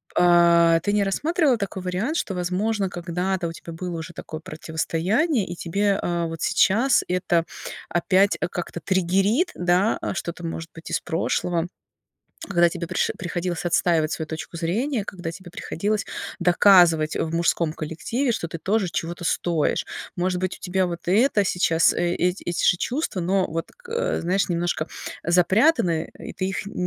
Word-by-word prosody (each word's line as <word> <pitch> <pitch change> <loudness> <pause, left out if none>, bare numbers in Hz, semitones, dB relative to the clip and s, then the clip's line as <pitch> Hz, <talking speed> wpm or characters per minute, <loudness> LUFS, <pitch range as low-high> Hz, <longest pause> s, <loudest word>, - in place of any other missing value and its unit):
А, 170 -1 +5
ты 205 - 0
не 210 -1 +3
рассматривала 295 - +1
такой 200 -2 -4
вариант, 190 - -1
что, 195 - -2
возможно, 190 +3 -1
когда-то 180 +1 -2
у - - -4
тебя 165 0 -9
было 175 +1 -5
уже 170 +2 -8
такое 155 - -7
противостояние 170 - -1
и 175 - -5
тебе, 200 +4 0
э, 170 -1 -1
вот 165 -1 -6
сейчас 235 +8 +3
это 175 -2 +1 0.4
опять 190 +3 +3
как-то 175 -1 -5
триггерит, 195 - +1
да, 180 +5 +2
что-то, 175 -1 -5
может 165 0 -5
быть, 165 - -10
из - - 0
прошлого, 170 0 -1 0.8
когда 175 -3 +4
тебе 170 -1 -5
приш 185 - 0
приходилось 175 -1 -3
отстаивать 170 -2 +2
свою 160 - -3
точку 160 +2 -7
зрения, 210 - -1
когда 175 -4 -6
тебе 175 +1 -10
приходилось 205 +5 -2 0.3
доказывать, 175 -3 +5
э, - - 0
в 160 - -4
мужском 170 -1 +1
коллективе, 200 - -2
что 195 -7 -2
ты 165 - -6
тоже 195 +4 0
чего-то 170 +1 -4
стоишь? 165 -2 0 0.3
Может 180 0 0
быть, 185 0 -2
у - - -30
тебя 185 0 0
вот 170 -1 -5
это 210 +3 +3
сейчас, 170 -3 +3
э, 175 0 0
эти 180 +2 0
эти 175 - -1
же 180 - +4
чувства, 255 - -2
но 185 +2 +1
вот, 165 +1 -4 0.2
э, 480 +2 -1
знаешь, 185 +4 +1
немножко 175 -2 -1 0.3
запрятаны, 180 - +3
и - - -8
ты 185 - -2
их 195 - -3
н 200 - -8
180 Hz, 165 wpm, -24 LUFS, 170-195 Hz, 0.8 s, А